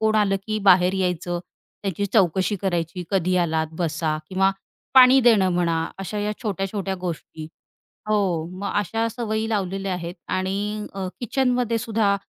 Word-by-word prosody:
कोण 220 0 +2
आलं, 200 -2 +3
की 215 0 -1
बाहेर 180 0 +6
यायचं, 180 -2 -1 0.4
त्यांची 200 0 -1
चौकशी 190 0 +2
करायची, 175 -1 -1
कधी 185 -2 +1
आलात 160 -2 +1
बसा, 160 -2 -1
किंवा 190 +1 +2 0.4
पाणी 260 0 +8
देणं 220 -6 +5
म्हणा, 170 -2 +1
अशा 195 +2 -4
या 210 +1 -1
छोट्या-छोट्या 195 -1 -2
गोष्टी 160 -3 -6 0.6
हो, 190 -7 +1
मग 200 - -3
अशा 225 +3 0
सवयी 220 -1 -2
लावलेल्या 195 -2 -1
आहेत. 175 -1 -5
आणि 200 +3 -2
अ, 195 -1 -3
किचनमध्ये 245 -1 +1
सुद्धा 215 -3 +1
195 Hz, 140 wpm, -23 LUFS, 180-215 Hz, 0.6 s, पाणी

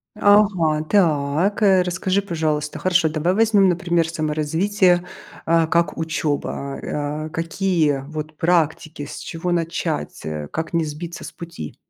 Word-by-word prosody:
Ага, 200 -7 +3
так, 165 +2 +1
э, 190 -2 +5
расскажи, 185 +2 0
пожалуйста, 155 -5 -2
хорошо. 180 -3 +2
Давай 155 +3 0
возьмем, 210 -2 +4
например, 175 -2 +1
саморазвитие, 165 +4 +1 0.4
э, 165 0 +4
как 170 0 +1
учеба. 150 -3 -2
А, 150 +1 -3
э, - - -6
какие 165 -4 0
вот 155 0 -6
практики, 160 -3 0
с - - -7
чего 165 +2 -4
начать, 165 - -2
э, 75 -1 -5
как 160 +2 -4
не 165 -1 +1
сбиться 165 +3 -7
с - - -7
пути? 170 - -8
165 Hz, 135 wpm, -21 LUFS, 155-180 Hz, 0.4 s, э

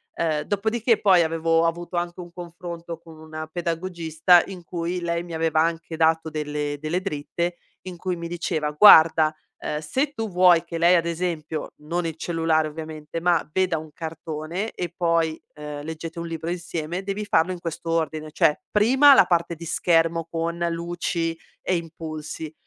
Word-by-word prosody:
Ehm, 155 -3 0
dopodiché 220 +4 +1
poi 185 -4 +5
avevo 165 +1 +1
avuto 175 +1 -2
anche 175 +1 -3
un 175 -1 -11
confronto 170 -1 -7
con 165 -2 -15
una 155 0 -7
pedagogista, 170 0 +2
in 185 -3 -9
cui 175 +1 -3
lei 170 0 -1
mi 175 - -9
aveva 160 -1 +1
anche 165 0 -1
dato 160 0 +2
delle 150 -1 -3
delle 155 +4 -2
dritte, 170 0 -3 0.3
in 180 -2 -8
cui 185 +1 -2
mi 170 0 -6
diceva: 165 -3 -2
"Guarda, 160 -2 +7 0.2
ehm, 150 - -3
se 265 - -1
tu 225 -5 -3
vuoi 180 -2 +5
che 170 0 -5
lei, 170 +2 +5
ad 170 -1 +2
esempio, 165 -2 -3
non 165 +3 -3
il 160 - -3
cellulare 160 -1 +1
ovviamente, 155 0 -6
ma 175 -2 +2
veda 185 -2 +1
un 155 -1 -11
cartone 160 +4 -5
e 175 -1 -5
poi, 165 -2 +1
ehm, 150 -1 -7
leggete 160 +2 -6
un 170 - -4
libro 165 0 -4
insieme, 170 0 -4
devi 200 +2 -4
farlo 185 -3 +2
in 180 - -5
questo 165 0 -5
ordine, 155 -2 -1
cioè: 165 -2 +2
prima 265 +7 +6
la - - +7
parte 170 -1 0
di 170 - -9
schermo 165 0 +1
con 170 +1 -3
luci 170 0 -2 0.3
e 185 - +1
impulsi, 160 -2 -6
165 Hz, 170 wpm, -24 LUFS, 160-175 Hz, 0.3 s, Guarda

